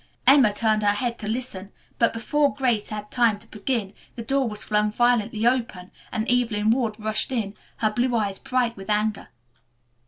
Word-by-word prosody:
Emma 265 -6 +6
turned 215 +1 +1
her 205 -1 +3
head 235 +3 -2
to 210 - -5
listen, 215 -4 -4 0.3
but 230 - +4
before 280 +4 0
Grace 245 -6 0
had 210 -1 -6
time 235 -4 +3
to 205 - -14
begin 215 -2 -3 0.2
the 230 - -6
door 270 +1 +1
was 210 -1 -4
flung 210 0 +1
violently 230 -1 +1
open 235 -7 0 0.2
and 220 - -2
Evelyn 225 -3 +2
Ward 230 -3 0
rushed 215 +3 -1
in, 220 -6 -2 0.2
her 215 -1 +1
blue 245 +2 0
eyes 200 -4 -1
bright 250 -3 0
with 195 +1 -10
anger. 210 0 0
220 Hz, 180 wpm, -24 LUFS, 210-245 Hz, 0.3 s, Emma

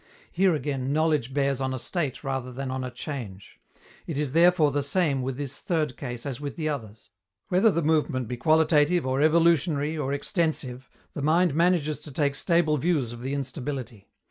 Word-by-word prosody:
Here 185 -2 +3
again 135 -3 -2
knowledge 150 -4 +1
bears 140 -1 0
on 130 0 -1
a - - -3
state 145 0 -2
rather 135 -2 -3
than 130 +1 -5
on 130 0 -3
a 125 - -3
change. 120 -9 -7 0.5
It 160 - -3
is 145 -2 -1
therefore 165 -1 +4
the 145 +1 0
same 140 -2 0
with 130 0 -3
this 140 -3 -5
third 160 - -1
case 120 -1 -6
as 140 -2 -4
with 145 -1 -5
the 155 -2 -2
others. 115 -7 -6 0.4
Whether 185 +5 +4
the 170 -5 0
movement 150 -5 +1
be 125 - -3
qualitative 155 +4 +3
or 130 +1 0
evolutionary 160 -1 +3
or 145 -3 -2
extensive, 140 -4 -2 0.2
the - - -5
mind 165 +3 +3
manages 165 -2 +2
to 150 - -9
take 140 +1 0
stable 165 0 +2
views 145 -6 0
of 120 - -9
the 135 +3 -3
instability. 130 -5 -5
145 Hz, 185 wpm, -26 LUFS, 130-160 Hz, 0.5 s, therefore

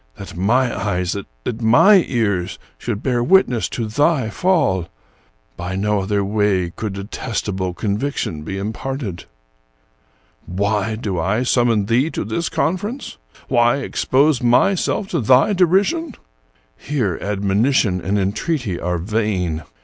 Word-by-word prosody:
That 100 - -10
my 120 +8 +1
eyes, 90 -3 -1 0.3
that 115 - -4
my 170 - +6
ears, 100 -8 -1 0.2
should 115 -3 -4
bear 125 -2 +1
witness 125 - +3
to 115 - -3
thy 130 +1 +1
fall! 125 - +1 0.7
By 90 +2 -4
no 105 +1 0
other 100 +1 0
way 100 -4 +1
could 105 +2 -5
detestable 100 -2 -4
conviction 105 - -2
be 95 +5 -5
imparted. 110 -1 -4 1.2
"Why 100 +3 -1
do 105 -6 -3
I 105 +8 0
summon 120 -4 +2
thee 125 +8 +2
to - - -3
this 170 -1 -2
conference? 205 - -2 0.3
Why 120 0 +3
ex - - -3
pose 140 +1 +3
myself 180 +11 +2
to - - -1
thy 130 - +4
derision? 200 - +2 0.6
Here 105 - -2
admonition 100 0 +1
and 100 +5 -1
en 95 -1 +1
treaty 120 - -2
are 90 0 -1
vain. 90 -4 -1
110 Hz, 130 wpm, -20 LUFS, 95-130 Hz, 1.2 s, my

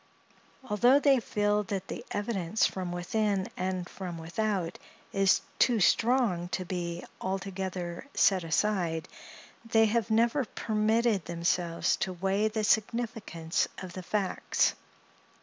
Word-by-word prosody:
Although 240 +6 +5
they 280 -2 +4
feel 210 -2 +1
that 195 0 -4
the - - -6
evidence 205 -2 0
from 185 -2 -2
within 195 +2 0
and 185 -1 -2
from 180 -3 -6
without 180 +1 -2 0.3
is 195 0 +4 0.2
too 240 -3 +4
strong 220 -5 +2
to 185 0 -3
be 175 -1 -4 0.2
altogether 190 -1 -4
set 190 -3 +4
aside, 165 -1 0 0.6
they 225 -1 +4
have 220 0 0
never 235 +5 +3
permitted 220 -2 +1
themselves 170 0 0
to 185 - -2
weigh 195 +4 +1
the 215 0 -2
significance 215 -6 0
of 185 -1 -7
the 185 - -6
facts. 195 +1 0
195 Hz, 120 wpm, -29 LUFS, 175-220 Hz, 0.6 s, Although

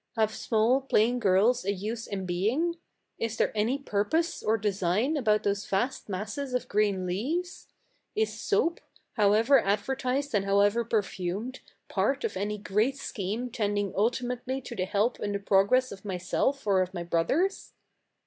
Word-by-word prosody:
Have 220 -1 +1
small, 230 +5 +2
plain 245 -2 +2
girls 210 +3 +3
a 200 - 0
use 215 +4 -4
in 195 -2 -4
being? 230 - 0 0.4
Is 225 -1 -2
there - - +2
any 220 +6 +1
purpose 280 +7 -1
or 220 +1 +2
design 205 - 0
about 215 -7 +2
those 200 0 -1
vast 230 +5 -1
masses 215 +8 -3
of 250 0 -2
green 200 -4 +1
leaves? 335 - -3 0.5
Is 440 +1 +1
soap, 405 -5 0 0.3
however 220 +5 +4
advertised 255 +7 -1
and 205 -2 +2
how 200 0 +3
ever 205 +4 +3
perfumed, 210 +2 -2 0.3
part - - 0
of 455 - -2
any 210 +1 -2
great 210 +7 0
scheme 225 +1 -4
tending 205 -4 -1
ulti 230 +5 +1
mately 250 +2 -3
to 240 - -6
the 185 - -1
help 205 +5 0
and 205 -1 -2
the - - -1
progress 200 +6 +3
of 195 -1 -9
myself 205 +8 -1
or 195 -2 +3
of 185 +1 -3
my 175 - -3
brothers?" 175 - 0
215 Hz, 160 wpm, -28 LUFS, 200-255 Hz, 0.5 s, however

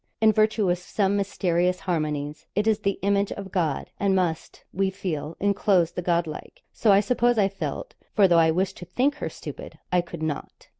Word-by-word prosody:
In 220 0 +5
virtue 215 -1 +2
of 175 0 +1
some 195 +2 0
mysterious 180 -2 0
harmonies 150 -4 -3
it 205 +2 +1
is 220 -1 +2
'the 200 -2 -1
image 200 0 +1
of 195 -2 -8
God,' 165 -8 -1
and 195 -1 +2
must, 170 -4 -2
we 195 +1 +1
feel, 165 -5 -4
enclose 200 -4 +2
the - - -4
God 170 -1 +1
like; 155 -1 -9
so 220 - +3
I 195 0 +6
suppose 240 +1 +2
I 200 -2 +4
felt, 200 - -5 0.2
for 200 -3 +6
though 170 -2 +5
I 160 0 +5
wished 185 +4 0
to 180 - -8
think 255 - +1
her - - -3
stupid, - - -9
I 180 -1 +3
could 170 -2 -8
not. 155 -2 -5
190 Hz, 200 wpm, -25 LUFS, 170-205 Hz, 0.2 s, I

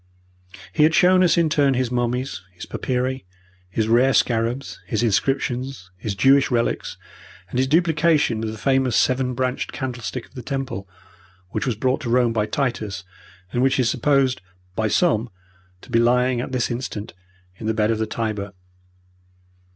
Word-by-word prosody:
He 155 - +1
had 155 +1 +5
shown 185 +1 +5
us 180 -1 +4
in 170 -1 +4
turn 140 -3 +2
his 125 -1 -1
mummies, 125 -3 -1
his 85 - -9
papyri, 130 +1 -2 0.5
his 110 +3 -1
rare 125 +4 +4
scarabs, 120 +3 0
his 115 -1 -1
inscriptions, 125 -2 -1
his 100 +2 -4
Jewish 135 +5 +4
relics, 120 -2 -1 0.5
and 125 - -1
his 130 - +2
duplication 155 -6 +2
of 110 - -2
the 110 - -8
famous 130 0 +1
seven 130 +1 +1
branched 130 0 -2
candlestick 125 -2 -5
of - - -26
the 125 - -7
Temple, 135 -9 -4 0.6
which - - -2
was 120 - 0
brought 130 +6 0
to 125 - -4
Rome 120 -1 +3
by 105 -2 0
Titus, 110 -7 -2 0.5
and 120 - 0
which 135 +1 +2
is 125 -2 +3
supposed 130 -4 +2 0.3
by 110 - +1
some 120 -4 +2 0.5
to 125 - -14
be 115 - +3
lying 125 +1 +3
at 130 - -6
this 125 -1 -1
instant 120 -3 -5 0.4
in 110 - -6
the 110 - +1
bed 110 0 +2
of 110 - -1
the 110 - -1
Tiber. 105 -3 -3
125 Hz, 165 wpm, -22 LUFS, 115-135 Hz, 0.6 s, had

